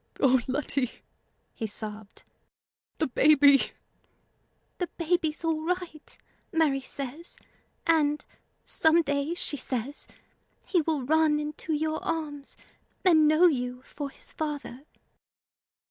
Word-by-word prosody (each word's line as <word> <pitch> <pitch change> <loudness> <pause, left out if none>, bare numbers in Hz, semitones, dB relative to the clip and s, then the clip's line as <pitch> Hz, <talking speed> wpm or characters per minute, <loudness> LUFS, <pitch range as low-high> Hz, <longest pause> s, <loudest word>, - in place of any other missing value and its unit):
"O 260 -2 +4
Letty!" 265 -2 0 0.6
he 225 - -4
sobbed 210 0 -7 0.7
"the 315 - +1
baby!" 280 0 +5 1.1
"The 355 - -1
baby's 335 -2 0
all 320 -1 0
right, 345 -2 -4 0.3
Mary 310 -6 +2
says; 280 +5 -7 0.5
and, 300 -3 +2 0.4
some 325 +1 +3
day, 285 +3 -1
she 295 - -1
says, 260 +2 -4 0.6
he 355 - +2
will 310 -3 -1
run 310 +2 +3
into 300 +2 -4
your 310 +1 -1
arms, 295 -4 -4 0.5
and 315 -4 +6
know 310 +4 +5
you 250 -5 0
for 285 0 -6
his - - -8
father." 290 -3 -5
300 Hz, 110 wpm, -28 LUFS, 275-320 Hz, 1.1 s, and